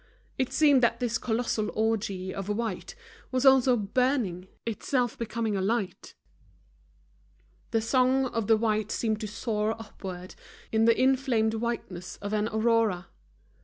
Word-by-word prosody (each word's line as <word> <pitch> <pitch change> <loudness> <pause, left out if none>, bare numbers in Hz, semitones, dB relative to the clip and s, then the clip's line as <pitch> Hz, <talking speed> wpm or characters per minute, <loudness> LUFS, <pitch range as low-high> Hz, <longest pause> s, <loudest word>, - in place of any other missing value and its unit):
It 260 - 0
seemed 290 -4 +5
that 235 -1 +2
this 235 -2 -1
colossal 220 -2 -1
orgy 200 -4 -1
of 195 0 -5
white 215 - -3 0.4
was 255 +1 0
also 265 -2 +6
burning, 210 -4 0 0.2
itself 245 +2 -1
becoming 230 -2 -2
a 195 - 0
light. 200 -2 -2 1.5
The 225 - +1
song 255 +3 +3
of 230 -4 -2
the 225 - +5
white 215 -1 0
seemed 220 -1 -1
to 215 - -3
soar 215 +1 -2
upward 185 -4 -8 0.4
in 220 0 +3
the 230 0 +4
inflamed 255 -4 +2
whiteness 220 -6 -4
of 205 +1 -5
an 210 0 +1
aurora. 220 -5 +1
225 Hz, 135 wpm, -28 LUFS, 210-245 Hz, 1.5 s, also